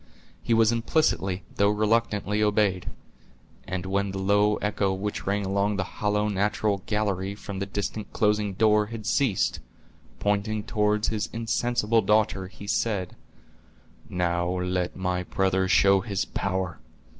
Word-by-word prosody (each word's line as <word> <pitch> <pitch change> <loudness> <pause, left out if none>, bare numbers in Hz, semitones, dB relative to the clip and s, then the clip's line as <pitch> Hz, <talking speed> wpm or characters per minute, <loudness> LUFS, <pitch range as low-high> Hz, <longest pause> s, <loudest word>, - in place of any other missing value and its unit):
He 115 - +1
was 115 0 +4
implicitly, 115 - 0
though 100 0 +4
reluctantly, 105 -1 +1
obeyed; 105 -3 +1 0.8
and 95 0 -3
when 100 +1 0
the 95 - -5
low 105 +2 +3
echo 105 -2 0
which 105 +1 -4
rang 100 0 0
along 100 +2 +1
the 95 - 0
hollow, 105 +2 -1
natural 100 0 0
gallery, 100 -3 -1
from 100 -2 -7
the 100 - -3
distant 100 +1 -4
closing 105 -1 +1
door, 105 +1 +3
had 110 -1 -7
ceased, 120 -4 +1 0.6
pointing 105 +1 0
toward 105 -1 +1
his 110 0 -1
insensible 115 -1 +1
daughter, 105 -3 +1
he 100 +1 -11
said: 100 -3 -1 0.9
"Now 85 -1 0
let 90 0 -1
my 90 -1 -1
brother 95 +1 0
show 95 +2 +5
his 100 -1 -2
power." 95 -2 -3
100 Hz, 135 wpm, -26 LUFS, 95-105 Hz, 0.9 s, show